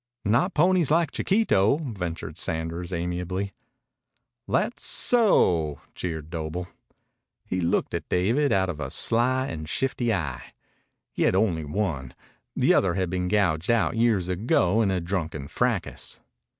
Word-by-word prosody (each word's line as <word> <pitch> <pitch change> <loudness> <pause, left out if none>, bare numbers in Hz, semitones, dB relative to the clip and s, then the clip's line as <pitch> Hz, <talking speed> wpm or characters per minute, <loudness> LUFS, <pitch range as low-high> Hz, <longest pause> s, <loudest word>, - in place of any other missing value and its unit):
"Not 120 - +2
ponies 175 -1 +3
like 165 +2 +2
Chiquito," 150 - +2
ventured 95 - -5
Sanders 85 +2 -3
amiably. 90 +3 -3 1.0
"That - - 0
so?" 90 - +3
jeered 80 -3 -5
Doble. 85 +2 -4 0.8
He 95 - -2
looked 85 - 0
at - - -4
David 115 +11 +2
out 95 -1 +2
of 85 -4 -5
a - - -4
sly 130 +3 +2
and 80 -8 -6
shifty 125 0 0
eye. 75 - -3 0.6
He - - -5
had - - +3
only 90 -6 +1
one. 75 -7 -3 0.4
The - - +3
other 95 -3 +2
had 95 -3 -1
been 90 -1 -1
gouged 90 -3 +1
out 115 0 +2
years 115 -6 +2
ago 95 +1 +2
in 105 - +2
a 95 -1 0
drunken 85 -5 -3
fracas. - - -2
95 Hz, 135 wpm, -25 LUFS, 85-115 Hz, 1.0 s, ponies